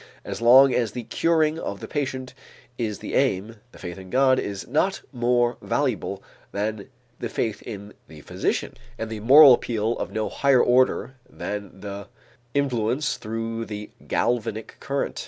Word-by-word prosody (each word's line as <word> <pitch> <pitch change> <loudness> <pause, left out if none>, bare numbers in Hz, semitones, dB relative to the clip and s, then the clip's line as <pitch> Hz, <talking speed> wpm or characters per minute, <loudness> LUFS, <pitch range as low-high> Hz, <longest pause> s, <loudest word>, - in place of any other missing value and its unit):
As - - -5
long 130 +3 +7
as 120 -2 0
the 125 - -5
curing 160 +6 +1
of 100 -9 -5
the - - -7
patient 130 -3 -3 0.4
is 110 -4 -3
the - - -7
aim, 105 +5 0
the - - -15
faith 90 0 -7
in 95 -1 -11
God 130 +2 +4
is 100 -1 -4
not 170 +9 0
more 120 -1 +1
valuable 115 -8 -2 0.3
than 105 +3 -3 0.3
the 120 - -3
faith 110 -2 -2
in 100 0 -8
the 75 -2 -13
physician - - -2 0.2
and 115 -1 -5
the 110 - -4
moral 135 +5 +9
appeal 115 -1 0
of - - -4
no 110 -1 -1
higher 135 -3 +3
order 130 +1 +2
than 100 -2 -6
the 100 0 -7 0.5
influence 135 0 0
through 115 +1 -4
the 105 -1 -7 0.2
galvanic 110 -2 -1
current. 140 0 -3
115 Hz, 155 wpm, -24 LUFS, 105-130 Hz, 0.5 s, moral